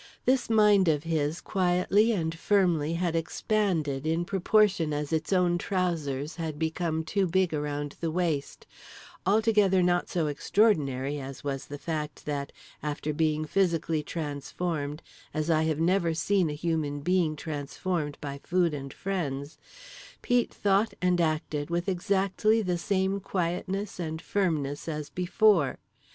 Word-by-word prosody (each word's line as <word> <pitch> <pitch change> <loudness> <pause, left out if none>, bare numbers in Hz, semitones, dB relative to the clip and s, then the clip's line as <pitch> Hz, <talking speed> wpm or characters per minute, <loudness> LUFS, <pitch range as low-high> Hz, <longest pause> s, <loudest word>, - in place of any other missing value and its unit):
This 255 -2 +2
mind 210 -4 +5
of 150 -2 +2
his 160 -1 -1
quietly 190 +4 +2
and 165 -6 -1
firmly 165 -4 +2
had 170 -1 -1
expanded 165 - 0
in 165 +2 0
proportion 190 -4 +2
as 145 +1 -2
its 160 +3 -1
owner's 180 -2 +3
trousers 165 -7 -2
had 160 -3 -4
become 160 0 -1
too 190 +4 0
big 185 0 +1
around 145 -1 -3
the 165 - 0
waist—altogether 190 +5 0
not 175 0 +1
so 170 -3 0
extraordinary 145 - +1
as 135 0 -8
was 135 -2 -3
the 145 - -6
fact 150 -1 -4
that, 145 -1 -3 0.3
after 150 0 -3
being 155 0 +1
physically 165 -3 +1
transformed 150 0 -4 0.3
as 155 +2 0
I 160 0 +3
have 160 -1 0
never 170 -1 +2
seen 180 +1 +2
a - - -3
human 150 -2 -2
being 175 -1 +1
transformed 150 +1 -3
by 140 -1 -6
food 175 -2 +1
and 140 -2 -5
friends, 150 -7 -4 0.6
Pete 245 0 +2
thought 200 +2 +1
and 180 -1 +2
acted 155 -2 -1
with 170 +2 -1
exactly 200 +4 +1
the 180 -2 -1
same 190 +1 0
quietness 185 +2 -3
and 160 -2 -3
firmness 155 -8 -1
as 150 -2 -4
before. 180 - +3
165 Hz, 140 wpm, -28 LUFS, 150-185 Hz, 0.6 s, mind